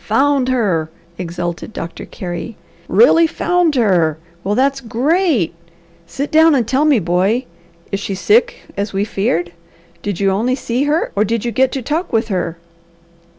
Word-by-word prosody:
"Found 270 +3 +2
her!" 190 -11 0 0.3
exulted 175 +2 -4
Doctor 165 0 -6
Carey. 180 +5 -6 0.3
"Really 335 -8 +5
found 350 -1 +1
her! 180 - +2 0.3
Well 205 +2 0
that's 270 +2 +1
great! 260 - +1 0.5
Sit 280 +8 -4
down 320 0 +6
and 240 -5 +1
tell 265 +5 +2
me, 295 -4 +4
boy! 190 +7 +1 0.5
Is 195 - -1
she 200 -1 -4
sick, 460 - +2
as 200 0 -3
we 195 +1 0
feared? 195 -5 -1 0.5
Did 205 -4 -3
you 195 -1 +2
only 230 +7 +1
see 255 +1 -1
her 300 +3 0
or 205 - +3
did 230 +1 -2
you 240 - -1
get 260 +2 +2
to 265 - -3
talk 320 +8 -2
with 225 0 0
her?" 175 -4 -2
230 Hz, 160 wpm, -17 LUFS, 195-280 Hz, 0.5 s, down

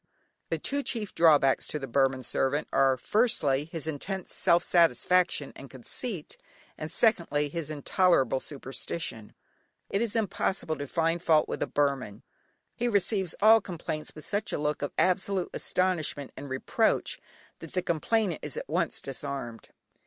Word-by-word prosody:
The - - 0
two 285 0 -1
chief 225 -7 -2
drawbacks 150 -5 +4
to - - -3
the 140 - -5
Burman 135 +1 +1
servant 135 +4 0
are, 135 -1 +4
firstly, 150 - +2
his 165 -3 -3
intense 180 +5 -4
self 170 +1 +3
satisfaction 170 -1 +2
and 135 - -11
conceit, 155 - -6 0.4
and 155 +1 -6
secondly, 170 -8 +2
his 160 -1 -4
intolerable 150 - +2
superstition. 135 -4 -5 0.6
It 200 - +1
is 235 -2 -1
impossible 195 -6 -1
to 145 0 -5
find 165 +3 0
fault 160 -3 +3
with - - -4
a - - 0
Burman. 135 -8 -1 0.5
He 240 - -1
receives 200 -4 +1
all 220 +1 +8
complaints 160 -4 -5
with 155 - -8
a 205 +1 0
look 150 0 -1
of 145 - -1
such - - -40
absolute 185 0 0
astonishment 170 -6 -1
and 140 - -8
reproach 130 0 0 0.4
that 165 - -10
the 185 - 0
complainant 180 +2 0
is 150 - -4
at - - -5
once 170 +2 -1
disarmed. 135 -4 -5
160 Hz, 150 wpm, -28 LUFS, 140-185 Hz, 0.6 s, all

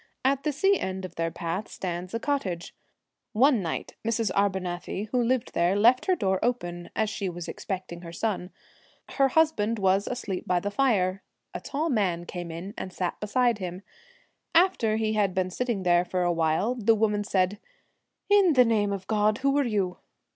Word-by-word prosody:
At 270 0 +2
the 300 - 0
sea 390 +7 +2
end 190 0 -3
of 180 - -9
their 165 -1 -1
path 170 +5 -4
stands 180 +2 -5
a - - -1
cot 285 +3 0
tage. 175 -3 -5 0.6
One 250 0 +4
night 165 -3 -4
Mrs. 230 -1 0
Arbunathy, 190 0 -1
who 250 - +2
lived 250 +1 0
there, 175 +3 +2
left 240 - +4
her 370 - +4
door 190 - 0
open, 175 -8 -2
as 220 - +1
she 210 -2 -3
was 175 -1 -7
expecting 185 -3 -5
her 170 -1 -8
son. 185 0 -2 0.6
Her 275 -1 +3
husband 255 -7 +2
was 195 0 +2
asleep 210 -7 -4
by 180 -1 +2
the 205 +3 -3
fire; 200 -6 +1 0.3
a - - -4
tall 305 +3 -2
man 180 -7 0
came 175 -1 -6
in 170 +5 -7
and 185 - -5
sat 180 -1 -3
beside 235 +1 +1
him. 180 0 -5 0.7
After 330 - +4
he 220 0 0
had 200 -3 +1
been 185 -1 0
sitting 235 -2 -2
there 175 -1 +4
for 180 0 -1
a 175 0 +2
while, 165 +7 +1
the 225 -2 +3
woman 210 -1 +1
said, 195 0 0 0.7
'In 400 -4 +5
the 250 -2 +6
name 210 -3 +2
of 195 -2 -4
God, 210 0 +2
who 275 0 +3
are - - +3
you?' 200 -7 -1
205 Hz, 190 wpm, -27 LUFS, 180-240 Hz, 0.7 s, the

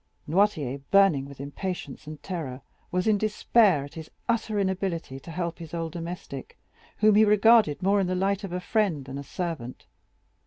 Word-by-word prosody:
Noirtier, 150 -7 +1
burning 195 -9 +5
with 140 -1 -12
impatience 145 0 -5
and 155 -1 -9
terror, 150 -9 -5 0.3
was 180 0 -1
in 215 -2 +3
despair 210 -5 +3
at 145 - -13
his 160 -1 -8 0.2
utter 225 -2 0
inability 190 -8 -2
to 140 - -13
help 170 0 -3
his 165 0 -7
old 165 -1 -3
domestic, 170 -5 -7 0.4
whom 215 0 +5
he 215 +2 +6
regarded 210 -5 +5
more 200 +2 +3
in 190 - +1
the 185 - -1
light 195 +2 0
of 195 - -5
a 180 - -2
friend 180 - 0
than 135 +1 -6
a - - -6
servant. 155 -7 -5
180 Hz, 180 wpm, -27 LUFS, 150-200 Hz, 0.4 s, he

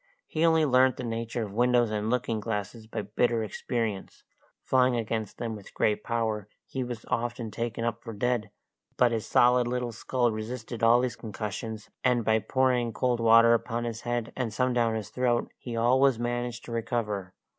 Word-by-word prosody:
He 155 - -2
only 160 -1 +4
learnt 130 -1 +4
the 130 - -5
nature 115 0 -3
of 100 -2 -7
windows 120 0 +3
and 105 0 -1
looking 120 -2 0
glasses 110 +1 -4
by 110 - -4
bitter 115 +3 +1
experience; 110 -1 -3 0.4
flying 130 -1 +3
against 110 -2 -3
them 115 -2 -3
with 100 -2 -12
great 105 - +1
force, 110 -3 -1 0.2
he 130 - -3
was 120 -2 -6
often 120 -1 -2
taken 115 +1 -3
up 115 0 -2
for 115 - -6
dead; 115 0 -1 0.5
but 125 -1 +4
his 115 -2 -2
solid 125 0 +4
little 125 -1 -2
skull 120 +1 0
resisted 110 +1 -5
all 115 +2 +6
these 125 -3 -1
concussions, 110 0 -6
and 125 -3 +2
by 110 0 +3
pouring 125 +1 +1
cold 125 -2 0
water 115 0 +6
upon 115 0 -1
his 115 -1 -4
head 120 -1 -2
and 125 -4 -2
some 125 +4 +1
down 115 -2 +2
his 105 -2 -4
throat, 120 -2 0
he 120 -2 -6
always 130 +2 +4
managed 120 0 -3
to - - -8
recover. 105 -5 -2
115 Hz, 180 wpm, -28 LUFS, 110-125 Hz, 0.5 s, all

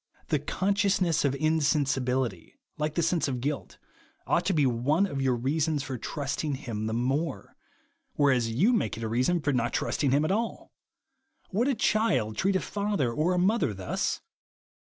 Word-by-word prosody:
The - - +2
consciousness 195 -3 +1
of 140 -1 +1
insensibility, 140 - 0 0.2
like 150 -1 -2
the 170 - +1
sense 165 -1 +1
of 130 -3 -2
guilt, 145 +3 -4 0.5
ought - - +1
to - - +2
be 150 -4 +3
one 130 +9 +2
of 140 -8 -3
your 130 -2 +2
reasons 145 +4 0
for 135 -3 -4
trusting 145 +3 -3
him 110 -5 -4
the 110 - -2
more, 130 -2 -2 0.6
whereas 130 -5 +2
you 180 - +3
make 220 - 0
it 115 - -6
a - - -1
reason 130 +10 +1
for 145 -1 0
not 120 -1 0
trusting 130 +4 0
him 140 +4 +3
at 155 - 0
all. 225 +3 -2 0.8
Would 225 +7 +1
a 275 - +2
child 210 - +1
treat 195 - +1
a - - +3
father 200 - -1
or 160 +8 +1
a - - 0
mother 185 - +2
thus 95 -1 -2
145 Hz, 170 wpm, -28 LUFS, 125-180 Hz, 0.8 s, be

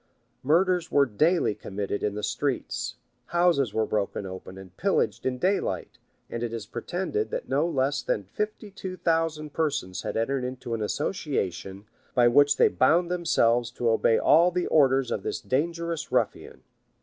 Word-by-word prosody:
Murders 175 +4 +2
were 140 -1 +5
daily 150 - +2
committed 100 0 -4
in 105 -1 -1
the 105 - -5
streets; 130 +5 -2 0.3
houses 170 - +2
were 110 +1 0
broken 100 -2 -2
open 95 0 -8
and 95 -1 -12
pillaged 195 - 0
in 130 -1 -1
daylight; 190 +8 -1 0.3
and 115 - -5
it 120 -1 -2
is 115 -2 -5
pretended, 190 - -3
that - - -4
no - - +1
less 140 -2 0
than 100 - -1
fifty 210 - -5
two 190 -1 -7
thousand 160 -3 0
persons 145 - -1
had - - -4
entered 130 +3 0
into 125 -1 -5
an 115 - -2
association, 105 - -3 0.3
by 120 -1 +5
which 145 +4 +5
they - - +6
bound 170 +7 +2
themselves 120 -9 +2
to 120 -1 0
obey 110 0 +3
all 170 +3 +5
the 180 0 -1
orders 135 -4 +3
of 105 - -1
this - - -3
dangerous 165 +4 -2
ruffian. - - -1
135 Hz, 160 wpm, -26 LUFS, 110-170 Hz, 0.3 s, they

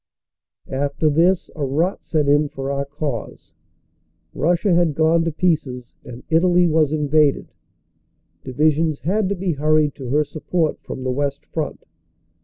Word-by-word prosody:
After 140 +3 0
this 170 +4 +2
a 150 - -4
rot 155 +8 -1
set 150 -3 0
in 145 +1 +3
for 135 -1 -5
our 140 0 -2
cause; 140 -5 -6 0.8
Russia 175 +6 +1
had 170 -4 +2
gone 160 +2 +3
to 165 - 0
pieces 145 -7 -1
and 120 0 -10
Italy 175 +2 +4
was 155 -3 +2
invaded; 150 -1 +1 0.9
divisions 155 +3 +1
had 190 +4 0
to 200 - -1
be 185 -1 -2
hurried 155 0 +2
to 130 -3 -8
her 150 +3 +2
support 155 +2 -2
from 130 - -7
the 130 - -1
West 140 +1 -2
Front. 155 -3 -5
150 Hz, 145 wpm, -21 LUFS, 140-165 Hz, 0.9 s, Italy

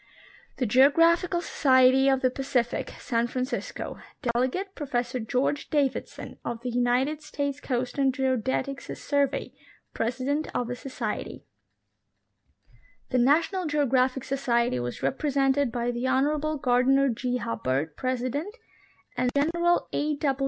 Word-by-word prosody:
The 255 - 0
Geographical 330 - +4
Society 265 -3 +4
of 265 -1 +2
the 255 - +2
Pacific 250 -3 -1
(San 235 -1 0
Francisco); 255 +2 -4 0.3
delegate. 260 +12 -1
Professor 250 -6 -2
George 255 +6 -1
Davidson, 285 -4 -2
of 235 -1 -4
the 250 - -2
United 250 +5 +1
States 285 -2 -3
Coast 250 +1 -2
and 270 -1 +4
Geodetic 260 +1 -1
Survey, 285 -1 -1 0.4
President 260 +6 -1
of 245 -1 -1
the - - -2
Societ3^. 255 +1 -5 1.7
The 255 - +2
National 330 +8 +2
Geographic 265 -3 +1
Society 235 - 0
was 120 0 -5
represented' 275 -2 +1
by 240 0 -1
the 240 +2 -2
Honorable 295 +4 +1
Gardiner 270 +1 +3
G. 245 +1 -1
Hubbard, 150 - -2
President, 255 - -3 0.6
and 250 0 +1
General 340 +4 +2
A. 295 0 0
265 Hz, 115 wpm, -27 LUFS, 245-285 Hz, 1.7 s, Geographical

